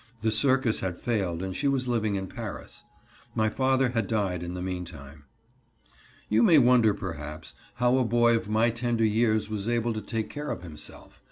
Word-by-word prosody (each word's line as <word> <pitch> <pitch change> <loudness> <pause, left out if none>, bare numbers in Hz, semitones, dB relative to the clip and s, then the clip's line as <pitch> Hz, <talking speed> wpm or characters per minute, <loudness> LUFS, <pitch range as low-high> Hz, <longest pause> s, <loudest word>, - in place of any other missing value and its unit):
The 110 - +2
circus 130 0 +2
had 90 -2 -3
failed 95 -7 -1
and 95 -1 -4
she 145 - 0
was 135 -2 0
living 110 -4 0
in 95 0 -2
Paris. - - -8 0.5
My 110 0 +2
father 130 0 +2
had 115 -4 -1
died 100 -6 -1
in 90 +1 -5
the 90 - -5
meantime. 80 -6 -7 1.0
You 110 +2 +3
may 160 +7 +6
wonder 120 -5 +5
perhaps 75 -3 -7 0.2
how 125 +1 +3
a - - +3
boy 120 0 +3
of 115 -2 -3
my 110 +2 +3
tender 115 -1 0
years 110 0 +2
was 110 0 -3
able 120 0 0
to 110 - -4
take 110 +1 -3
care 150 0 -5
of - - -4
himself. 80 -3 -10
110 Hz, 185 wpm, -27 LUFS, 95-120 Hz, 1.0 s, may